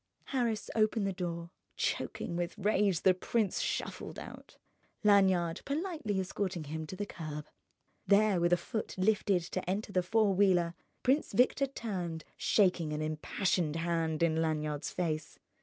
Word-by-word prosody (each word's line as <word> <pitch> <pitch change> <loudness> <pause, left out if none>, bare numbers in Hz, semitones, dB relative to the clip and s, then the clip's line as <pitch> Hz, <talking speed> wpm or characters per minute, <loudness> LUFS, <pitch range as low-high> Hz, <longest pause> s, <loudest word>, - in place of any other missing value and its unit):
Harris 235 -4 0
opened 215 -1 +2
the 195 - -1
door. 170 -1 -4 0.3
Choking 170 - -2
with 175 +3 -3
rage, 205 -3 +2
the 190 - +5
prince 205 +2 0
shuffled - - -3
out, - - -10 0.5
Lanyard 190 -5 +4
politely 290 - -2
escorting 185 -2 -2
him 155 +1 -5
to 185 - -6
the 205 +2 -3
curb. 155 -6 -6 0.6
There, 200 -3 +4
with 175 0 +3
a 175 - +5
foot 215 +5 -4
lifted 195 -2 +2
to 180 +1 -4
enter 205 +2 -2
the 185 - +2
four 210 +2 +2
wheeler, 180 -3 +3 0.3
Prince 270 0 +2
Victor 255 +5 +3
turned, 180 - -4
shaking 180 -6 +2
an 150 +1 -2
impassioned 155 +1 0
hand 165 -1 0
in 160 -1 +2
Lanyard's 155 -2 -1
face. 155 -4 -3
185 Hz, 145 wpm, -32 LUFS, 165-210 Hz, 0.6 s, the